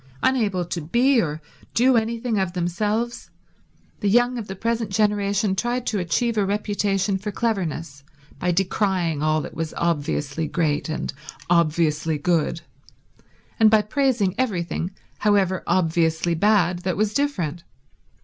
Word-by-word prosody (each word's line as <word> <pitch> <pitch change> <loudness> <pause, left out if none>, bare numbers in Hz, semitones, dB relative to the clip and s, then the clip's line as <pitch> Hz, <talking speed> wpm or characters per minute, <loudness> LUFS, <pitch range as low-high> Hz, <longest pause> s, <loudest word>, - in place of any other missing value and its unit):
Unable 210 -9 +1
to 170 0 -4
be 240 - +3
or 155 -3 -4 0.3
do 255 +2 +4
anything 230 0 0
of 190 -2 -1
themselves, 210 +7 -2 0.7
the 205 - +1
young 245 +3 +3
of 215 - -6
the 190 - -6
present 230 +1 -1
generation 205 0 +1
tried 240 +4 -1
to 210 - -1
achieve 220 +6 0
a - - +3
reputation 200 -1 0
for 210 +2 -4
cleverness 170 - -2 0.4
by 180 +2 +1
decrying 180 -3 0
all 155 0 +2
that - - -7
was 160 -1 -4
obviously 150 -2 -1
great 150 -1 -1
and 155 - -3 0.4
obviously 160 -2 +2
good 165 +1 0 1.0
and 220 -1 +7
by 215 -1 +4
praising 230 -5 +1
everything, 180 -7 -1 0.3
however 195 -3 +2
obviously 170 -1 +1
bad, 180 -1 +2
that 180 0 -2
was 215 0 +1
different. 180 - -1
190 Hz, 135 wpm, -23 LUFS, 170-220 Hz, 1.0 s, and